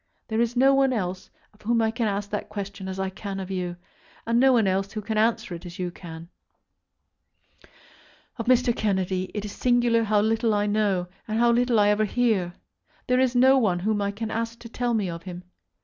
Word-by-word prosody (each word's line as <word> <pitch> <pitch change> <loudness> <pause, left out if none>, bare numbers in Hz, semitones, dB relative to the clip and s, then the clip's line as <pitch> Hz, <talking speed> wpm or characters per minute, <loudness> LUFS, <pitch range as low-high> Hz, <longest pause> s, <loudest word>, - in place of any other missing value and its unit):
There 220 +1 +1
is 235 +1 0
no 270 +2 +5
one 270 -1 +3
else 185 -4 -3 0.2
of 210 - -24
whom 230 +2 +1
I 220 -1 +2
can 225 0 -1
ask 200 0 -3
that 210 - -4
question 200 -1 -6
as 190 0 -5
I 190 0 -2
can 195 0 -6
of 190 0 -6
you, 180 -2 -3 0.5
and 230 +1 +2
no 265 +1 +6
one 235 -4 +3
else 195 +1 0
who 215 - -3
can 215 +1 -4
answer 220 -3 +1
it 170 - -8
as 175 0 -9
you 180 -2 -3
can 165 -2 -10 1.3
do. - - -21 0.7
Of 230 - -5
Mr. 250 -1 +3
Kennedy 190 -3 -1
it 210 0 -3
is 205 - -6
singular 240 -1 +2
how 210 -1 +2
little 225 0 +1
I 205 0 +1
know, 205 -3 +1 0.2
and 215 0 -2
how 235 +1 +4
little 240 -1 +2
I 205 0 +4
ever 210 +1 +2
hear. 205 -7 0 0.5
There 250 0 +2
is 260 -1 +2
no 265 +2 +6
one 200 -7 +1
whom 210 +1 0
I 200 - 0
can 220 +2 -5
ask 230 +1 -3
to 230 - -10
tell 240 0 -1
me 205 -4 0
of 170 -1 -5
him. 180 -1 -8
215 Hz, 220 wpm, -25 LUFS, 190-235 Hz, 1.3 s, no